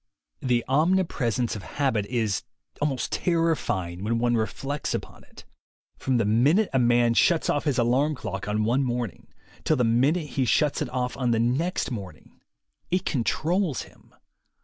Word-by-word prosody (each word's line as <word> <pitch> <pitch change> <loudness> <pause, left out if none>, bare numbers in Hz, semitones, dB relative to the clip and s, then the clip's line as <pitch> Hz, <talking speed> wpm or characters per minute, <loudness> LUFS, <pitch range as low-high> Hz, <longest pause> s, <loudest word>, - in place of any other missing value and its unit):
The 120 -2 +1
omnipresence 135 -6 +1
of 105 - -6
habit 115 -4 -1
is 110 -5 0 0.4
almost 135 -5 -1
terrifying 155 - 0
when 115 +2 0
one 120 0 +1
reflects 135 +6 -2
upon - - -7
it. - - -16 0.5
From 130 -2 +1
the 115 - +1
minute 140 - +3
a 130 - +3
man 120 -1 +3
shuts 165 +7 +3
off 145 - -1
his 145 -4 +1
alarm 130 +6 +2
clock 95 -6 -5
on 105 +1 0
one 125 +5 +2
morning, 120 -5 -3 0.4
till - - +2
the 125 - +2
minute 140 +8 +2
he 135 -2 0
shuts 145 +4 +2
it - - -2
off 125 -1 -2
on 125 -3 0
the 115 -1 +2
next 130 +11 0
morning, 95 -8 -9 0.5
it 180 +1 0
controls 160 - 0
him. - - -20
125 Hz, 160 wpm, -26 LUFS, 115-150 Hz, 0.5 s, minute